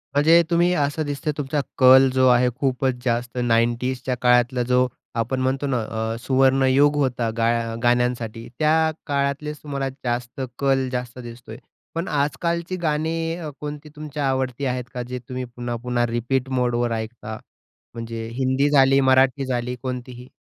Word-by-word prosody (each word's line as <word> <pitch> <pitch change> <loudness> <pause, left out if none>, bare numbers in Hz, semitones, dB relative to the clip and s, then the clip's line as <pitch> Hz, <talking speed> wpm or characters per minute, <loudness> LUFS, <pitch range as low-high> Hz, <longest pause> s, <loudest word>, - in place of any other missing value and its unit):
म्हणजे 165 +4 +6
तुम्ही 175 +1 +3
असं 145 0 0
दिसतंय 145 +1 -2
तुमचा 145 +1 -1 0.2
कल 130 0 +7
जो 130 0 +4
आहे 125 0 +4
खूपच 130 -1 0
जास्त 120 +1 -1
90sच्या 120 +2 0
काळातला 125 0 +3
जो 125 +1 +2 0.3
आपण 115 +3 -1
म्हणतो 135 +2 0
ना 130 -2 0 0.4
अ, - - -4
सुवर्णयुग 135 +3 +3
होता 125 -5 0
गा 115 0 +2 0.3
गाण्यांसाठी. 120 -2 0
त्या 160 +1 +3 0.2
काळातलेच 140 +1 -1
तुम्हाला 140 -2 -3
जास्त 120 +1 -3 0.2
कल 135 -1 +2
जास्त 125 0 -4
दिसतो 120 -1 -10
आहे, 110 - -9 0.4
पण 165 +2 -2
आजकालची 170 +5 -1
गाणी 165 +2 -1 0.2
कोणती 150 0 -7
अ, - - -20
तुमच्या 150 -2 -3
आवडती 130 0 -1
आहेत 125 -1 -1
का? 125 - -3
जे 125 +1 -6
तुम्ही 125 0 -4
पुन्हा-पुन्हा 120 0 -2
रिपीट 120 +3 -1
मोडवर 120 -1 0
ऐकता? 110 -1 -5 0.6
म्हणजे 115 -1 -6
हिंदी 130 +2 +1
झाली, 135 -1 +5
मराठी 130 +1 +3
झाली, 125 -1 -2
कोणतीही? 125 -1 -6
130 Hz, 145 wpm, -23 LUFS, 120-140 Hz, 0.6 s, कल